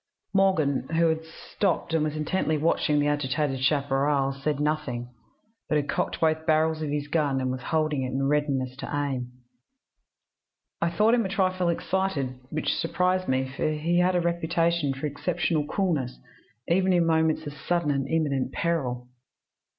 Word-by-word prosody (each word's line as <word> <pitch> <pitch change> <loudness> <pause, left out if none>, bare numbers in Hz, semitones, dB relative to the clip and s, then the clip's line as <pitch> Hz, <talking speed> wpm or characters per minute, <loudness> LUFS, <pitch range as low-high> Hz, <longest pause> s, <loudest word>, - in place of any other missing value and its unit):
"Morgan, 160 -9 +2
who 165 0 +4
had 160 0 -1
stopped 165 +1 -2
and 160 -2 +2
was 155 0 -2
intently 155 0 0
watching 150 -1 +1
the 145 - +2
agitated 145 -1 0
chaparral, 140 -1 +1
said 140 +1 -2
nothing, 145 -5 -2 0.6
but - - +2
had 145 -1 +1
cocked - - -1
both 160 0 +1
barrels 155 0 +2
of 155 - -2
his 145 0 -2
gun, 145 -3 +1
and 130 -1 -1
was 130 0 -4
holding 155 -1 0
it 130 - -1
in 135 +1 0
readiness 140 -3 0
to - - -6
aim. 135 -4 -2 1.5
I 170 - +2
thought 210 +7 +3
him 240 -1 +3
a 190 - -3
trifle 185 -2 +1
excited, 165 -8 -1
which 155 0 -1
surprised 185 +2 0
me, 130 0 +1
for 155 - 0
he 165 +3 +1
had 180 +1 +3
a 175 - +3
reputation 170 -2 +1
for 135 +2 -4
exceptional 150 +1 -1
coolness, 155 -10 -1 0.5
even 185 +2 +3
in 175 -1 +3
moments 160 -1 +2
of 145 - -5
sudden 170 +1 0
and 135 -1 -1
imminent 140 -4 0
peril. 125 -8 -1
155 Hz, 165 wpm, -26 LUFS, 140-170 Hz, 1.5 s, who